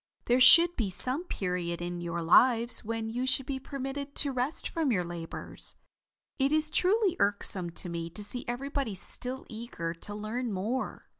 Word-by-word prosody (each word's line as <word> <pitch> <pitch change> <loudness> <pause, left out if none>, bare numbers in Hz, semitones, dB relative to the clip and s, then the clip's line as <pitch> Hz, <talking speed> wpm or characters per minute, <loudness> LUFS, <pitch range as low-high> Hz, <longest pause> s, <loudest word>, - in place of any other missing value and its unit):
There 245 +2 +2
should 340 +6 +8
be 220 -5 -1
some 255 - +3
period 180 - -3
in 175 0 -5
your 170 0 -4
lives 235 +8 +3
when 225 0 -4
you 250 +3 -2
should 260 0 +2
be 270 0 -4
permitted 275 +1 -6
to 285 - +2
rest 255 +4 0
from 320 -5 -1
your 185 -6 +1
labors. 170 -1 -8 0.6
It 270 +1 +2
is 310 0 +1
truly 385 0 +2
irksome 200 -3 +3
to 170 - -4
me 170 -1 -5
to 210 +5 -2
see 245 +4 -2
everybody 265 -2 -3
still 250 +7 -5
eager 220 -8 -6
to 205 +5 -9
learn 225 +3 -4
more. 210 +7 -3
240 Hz, 170 wpm, -29 LUFS, 185-270 Hz, 0.6 s, should